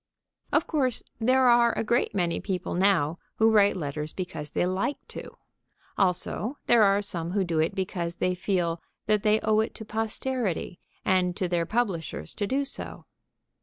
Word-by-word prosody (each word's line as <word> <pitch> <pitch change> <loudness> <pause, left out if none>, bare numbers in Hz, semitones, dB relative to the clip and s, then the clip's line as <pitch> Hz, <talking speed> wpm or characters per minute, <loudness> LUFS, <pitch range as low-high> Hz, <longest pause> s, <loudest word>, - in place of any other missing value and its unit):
Of - - +3
course, 260 -6 0 0.2
there 255 +3 +4
are 235 -1 +5
a - - +1
great 235 -1 +1
many 175 -3 0
people 185 -3 -3
now 175 -4 +2 0.2
who 225 0 +4
write 205 -2 +4
letters 150 -1 -4
because 160 -5 -5
they 175 - 0
like 185 +10 -1
to. - - -9 0.6
Also, 200 +7 0
there 235 -2 +5
are 200 0 +4
some 170 -3 -4
who 200 -1 +2
do 170 -3 -1
it 160 +5 +1
because 180 -3 -2
they 180 0 0
feel 175 -2 -1 0.2
that 210 -1 +2
they 215 0 +3
owe 215 0 +3
it 220 - -1
to 220 - -8
posterity 220 -4 -2 0.3
and 180 -1 +2
to 185 - 0
their 170 -1 0
publishers 180 - -2
to 205 - -2
do 275 +5 0
so. 275 - -7
195 Hz, 170 wpm, -27 LUFS, 175-220 Hz, 0.6 s, are